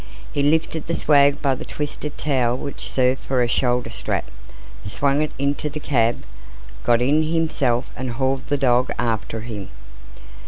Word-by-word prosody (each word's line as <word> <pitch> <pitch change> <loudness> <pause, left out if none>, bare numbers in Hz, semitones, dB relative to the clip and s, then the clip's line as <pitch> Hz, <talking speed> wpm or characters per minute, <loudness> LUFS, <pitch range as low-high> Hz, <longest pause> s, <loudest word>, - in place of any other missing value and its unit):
He 145 - +1
lifted 160 +1 +1
the 170 - 0
swag 145 -1 +4
by 135 -2 +3
the 130 - -5
twisted 150 0 -5
towel 125 -5 +1
which 140 +1 -4
served 130 0 +2
for 130 -2 +1
a - - +1
shoulder 120 -1 +1
strap, - - -3 0.5
swung 140 +8 +1
it 155 - 0
into 140 +2 -1
the 150 +1 -5
cab, 120 -5 +1 0.6
got 120 0 +3
in 145 +5 +3
himself 155 -6 +1
and 130 -1 -4
hauled 130 +2 -1
the 145 - +1
dog 125 -1 +3
after 115 -1 -2
him. 105 -4 -6
135 Hz, 160 wpm, -22 LUFS, 120-145 Hz, 0.6 s, swag